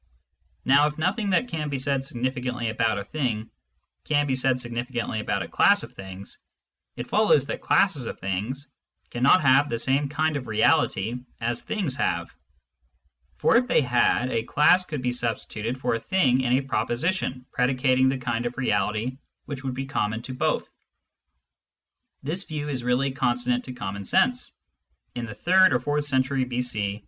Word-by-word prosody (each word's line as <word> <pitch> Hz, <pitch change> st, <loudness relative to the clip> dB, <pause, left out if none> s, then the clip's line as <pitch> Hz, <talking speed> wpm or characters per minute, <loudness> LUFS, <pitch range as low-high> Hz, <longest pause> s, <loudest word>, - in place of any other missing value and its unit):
Now, 140 Hz, +3 st, +5 dB
if 150 Hz, -, -5 dB
nothing 195 Hz, +6 st, 0 dB
that 235 Hz, +7 st, +2 dB
can 155 Hz, -9 st, -3 dB
be 140 Hz, -, -2 dB
said 135 Hz, 0 st, 0 dB
significantly 125 Hz, -2 st, -3 dB
about 110 Hz, -1 st, 0 dB
a -, -, -5 dB
thing 115 Hz, -3 st, -3 dB, 0.6 s
can 145 Hz, -1 st, +2 dB
be 135 Hz, -, 0 dB
said 130 Hz, 0 st, +2 dB
significantly 120 Hz, -1 st, -3 dB
about 105 Hz, -, -1 dB
a -, -, -8 dB
class -, -, +4 dB
of -, -, -10 dB
things, 95 Hz, 0 st, -10 dB, 0.6 s
it -, -, -5 dB
follows -, -, +3 dB
that -, -, -4 dB
classes -, -, +2 dB
of -, -, -6 dB
things 110 Hz, +9 st, -4 dB, 0.4 s
cannot 130 Hz, +9 st, +4 dB
have 135 Hz, +2 st, +4 dB
the 115 Hz, -, -1 dB
same 135 Hz, +3 st, +2 dB
kind 155 Hz, +1 st, 0 dB
of 130 Hz, -, -7 dB
reality 110 Hz, -1 st, +2 dB, 0.2 s
as 120 Hz, 0 st, -2 dB
things 175 Hz, -11 st, -2 dB
have; -, -, -1 dB, 1.0 s
for -, -, +4 dB
if 250 Hz, +1 st, +1 dB
they 250 Hz, -, +3 dB
had, 125 Hz, 0 st, +2 dB
a 115 Hz, -, 0 dB
class 165 Hz, +9 st, +4 dB
could 150 Hz, -7 st, -5 dB
be 125 Hz, -, +1 dB
substituted 115 Hz, 0 st, -3 dB
for -, -, 0 dB
a 115 Hz, -, -1 dB
thing 130 Hz, -1 st, +2 dB
in 125 Hz, -1 st, +1 dB
a 130 Hz, -, +3 dB
proposition 135 Hz, 0 st, -2 dB
predicating 130 Hz, 0 st, +2 dB
the 135 Hz, -, -1 dB
kind 120 Hz, -1 st, -2 dB
of 120 Hz, -, -7 dB
reality 125 Hz, -1 st, -1 dB, 0.3 s
which 140 Hz, -2 st, -6 dB
would 130 Hz, -2 st, -3 dB
be 135 Hz, +1 st, -4 dB
common 110 Hz, -5 st, -2 dB
to 130 Hz, -, -6 dB
both. 125 Hz, -, -1 dB, 1.6 s
This 170 Hz, +7 st, -1 dB
view 150 Hz, -1 st, -4 dB
is 130 Hz, -4 st, -3 dB
really 125 Hz, +3 st, +1 dB
consonant 125 Hz, -1 st, 0 dB
to 130 Hz, -, -7 dB
common 100 Hz, -4 st, -5 dB
sense. -, -, +1 dB, 0.6 s
In 120 Hz, -1 st, -5 dB
the 105 Hz, -, -8 dB
third 185 Hz, -, +4 dB
or 125 Hz, -, +2 dB
fourth 145 Hz, +3 st, -1 dB
century 135 Hz, -1 st, +1 dB
b.c. 115 Hz, -5 st, -2 dB
130 Hz, 170 wpm, -25 LUFS, 120-145 Hz, 1.6 s, Now